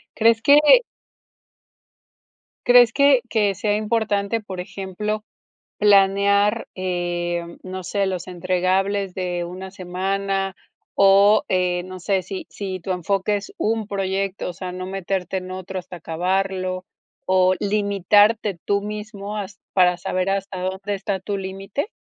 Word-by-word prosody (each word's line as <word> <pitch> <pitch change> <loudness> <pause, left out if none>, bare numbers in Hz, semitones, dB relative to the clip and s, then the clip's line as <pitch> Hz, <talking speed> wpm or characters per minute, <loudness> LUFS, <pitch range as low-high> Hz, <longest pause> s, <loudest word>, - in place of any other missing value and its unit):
¿Crees 225 0 +4
que 285 +4 +7 2.1
crees 245 -1 +7
que 280 -3 +5
que 205 -3 +1
sea 205 +2 0
importante, 215 0 0
por 190 -4 -8
ejemplo, 200 +3 -4 0.6
planear, 200 +1 +4
eh, 175 -2 -2 0.2
no 185 0 -6
sé, 200 +2 0
los 185 -2 -3
entregables 185 +2 0
de 180 -2 -2
una 185 +2 -7
semana?, 195 +1 -2 0.4
o, 200 +2 +5
eh, 180 -1 +1
no 185 0 -9
sé, 190 +1 0
si 190 +1 -7
si 190 -2 -5
tu 185 +2 -3
enfoque 195 +3 0
es 200 - -7
un 220 -1 0
proyecto, 195 -1 -2
o - - -6
sea, 180 +1 -6
¿no 185 0 -5
meterte 190 0 -2
en 185 0 -8
otro, 185 0 -5
hasta 180 0 -8
acabarlo?, 185 +2 -2 0.4
o, 185 0 +4
¿limitarte 205 0 +2
tú 200 0 +1
mismo 210 0 -6
has 200 0 -7 0.2
para 180 -2 +4
saber 185 +1 -2
hasta 195 -1 -3
dónde 190 +2 -3
está 195 -1 -3
tu 200 +1 -3
límite? 195 - -4
195 Hz, 135 wpm, -22 LUFS, 185-205 Hz, 2.1 s, que